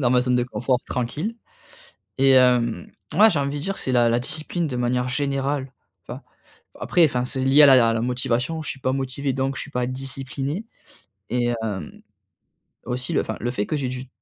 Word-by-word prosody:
dans 120 -3 +2
ma 125 - +4
zone 125 0 +1
de 125 - +2
confort 125 0 -1
tranquille. 150 - -3 0.8
Et 135 -1 +5
heu, 125 -2 +3 0.3
mouais, 215 +6 +7
j'ai 155 - 0
envie 140 +1 -2
de 145 - -6
dire, 195 +2 -3
c'est 130 - -2
la 120 -1 +3
discipline 155 +6 -2
de 130 - -4
manière 125 +1 0
générale, 135 0 -2 0.3
enfin, - - -8 0.6
après, 175 -2 +3
enfin, 125 -4 +1
c'est 130 0 -1
lié 135 +3 +6
à - - +9
la 125 -4 +6
la 115 - -1
motivation, 125 +5 -1
je - - -6
suis 135 - -7
pas 130 - 0
motivé 135 +1 -2
donc 135 +1 -2
je - - -4
suis - - -9
pas 125 -3 -1
discipliné. 135 - -4 0.6
Et 120 -1 0
hem, 95 -8 -5 0.8
aussi 125 +1 -3
le - - +2
enfin - - -5
le 120 - -1
fait 105 -4 -2
que 155 - -2
j'ai 135 -3 -2
du 130 0 -6
130 Hz, 200 wpm, -23 LUFS, 125-140 Hz, 0.8 s, à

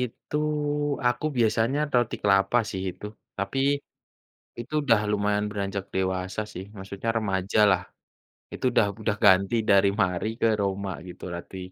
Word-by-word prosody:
itu, 125 +4 -4 0.7
aku 125 +3 +1
biasanya 115 +3 +2 0.2
roti 120 -2 +2
kelapa 100 +3 +3
sih 95 -2 -4
itu. 95 - -9 0.3
Tapi 100 +7 -2 1.0
itu 120 +5 -8
udah 115 -6 +4
lumayan 105 0 +1
beranjak 100 -1 -3
dewasa 95 +1 -1
sih, 90 - -6
maksudnya 95 +3 -6
remajalah. 100 -1 +2 0.7
Itu - - -4
udah 115 - +4 0.2
udah 110 -1 0
ganti 100 +2 +5
dari 100 0 +6
Marie 95 +4 0
ke - - +4
Roma 100 0 -2 0.2
gitu, 90 - -11
roti, 90 +2 -8
100 Hz, 135 wpm, -26 LUFS, 95-110 Hz, 1.0 s, dari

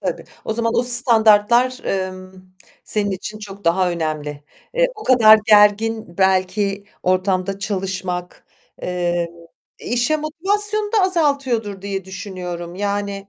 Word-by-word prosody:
Tabii. - - -4 0.2
O 220 - -2
zaman 230 0 -1
o - - +2
standartlar, 240 0 +4
emm, 185 -1 -4 0.5
senin 205 -2 -1
için 210 +3 -6
çok 200 -2 -11
daha 180 +2 +2
önemli. 155 -3 -4 0.3
Eee, - - +3
o 425 - -11
kadar 220 -4 +7
gergin 210 -2 +3
belki 195 +1 +1 0.2
ortamda 185 +1 0
çalışmak, 190 -3 -4 0.4
eee, 175 -1 -1 0.5
işe 245 +6 0
motivasyonu 410 +7 -1
da 430 - +3
azaltıyordur 275 - 0
diye 195 -2 -4
düşünüyorum. 180 -3 -7
Yani, 200 0 -3
200 Hz, 115 wpm, -19 LUFS, 185-235 Hz, 0.5 s, kadar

